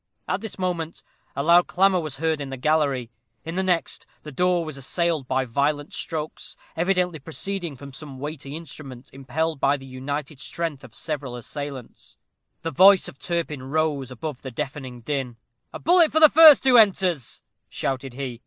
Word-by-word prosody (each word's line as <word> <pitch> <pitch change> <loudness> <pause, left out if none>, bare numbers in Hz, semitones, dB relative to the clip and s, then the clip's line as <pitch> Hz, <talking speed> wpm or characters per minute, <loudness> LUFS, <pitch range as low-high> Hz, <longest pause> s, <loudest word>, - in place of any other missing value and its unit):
At - - -1
this 220 - -7
moment 175 -3 -3 0.3
a 140 - -1
loud 170 +3 +5
clamor 190 0 +3
was 155 -5 -5
heard 160 0 0
in 140 - -5
the 135 - -5
gallery. 140 -4 +1 0.3
In 165 - -5
the 185 - 0
next, 180 -3 -1 0.2
the 150 - -8
door 180 +3 +1
was 155 -2 -6
assailed 155 +1 -1
by 130 0 0
violent 145 +4 -1
strokes, 155 -2 -5 0.2
evidently 180 -1 +1
proceeding 170 +4 -3
from 140 +1 -11
some 140 -1 -10
weighty 145 0 -6
instrument, 140 -6 -9
impelled 140 +4 -2
by 140 +2 +3
the 135 - -12
united 135 +2 -5
strength 150 +1 -4
of 125 -4 -12
several 145 -6 -4
assailants. 135 +1 -8 0.5
The 165 - -2
voice 190 +5 +6
of 135 - -11
Turpin 170 -5 -3
rose 145 -1 -1
above 130 +2 -6
the 130 - -6
deafening 130 0 -6
din. 130 -2 -3 0.3
"A - - -6
bullet 345 -2 +4
for 315 - +3
the 310 -1 +9
first 315 -1 +9
who 260 -2 +6
enters," 185 - +2 0.3
shouted 135 -2 -3
he. 130 -3 -5
150 Hz, 170 wpm, -24 LUFS, 135-170 Hz, 0.5 s, the